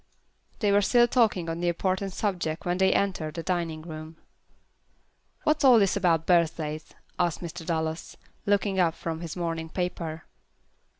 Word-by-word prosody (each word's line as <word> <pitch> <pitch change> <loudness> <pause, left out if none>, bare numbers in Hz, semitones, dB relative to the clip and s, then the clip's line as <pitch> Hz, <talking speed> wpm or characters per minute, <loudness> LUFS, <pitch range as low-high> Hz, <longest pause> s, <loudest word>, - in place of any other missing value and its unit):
They 205 -2 +3
were 200 +1 +5
still 240 +4 +4
talking 220 -8 +2
on 165 0 -3
the 175 - -1
important 185 +3 -1
subject 175 -6 -2
when 175 +1 0
they 190 0 +4
entered 175 -6 0
the 165 - -4
dining 165 -3 -2
room. 155 -1 -8 1.3
"What's 305 -1 +2
all 255 -3 +8
this 200 -3 +3
about 170 -5 +2
birthdays?" 160 -3 0 0.2
asked 175 -2 0
Mr. 170 0 -6
Dallas, 160 -1 -3 0.3
looking 200 -1 +2
up 170 -3 +3
from 165 -1 -5
his 165 -2 -6
morning 165 -2 -3
paper. 170 -3 -4
175 Hz, 155 wpm, -27 LUFS, 160-195 Hz, 1.3 s, all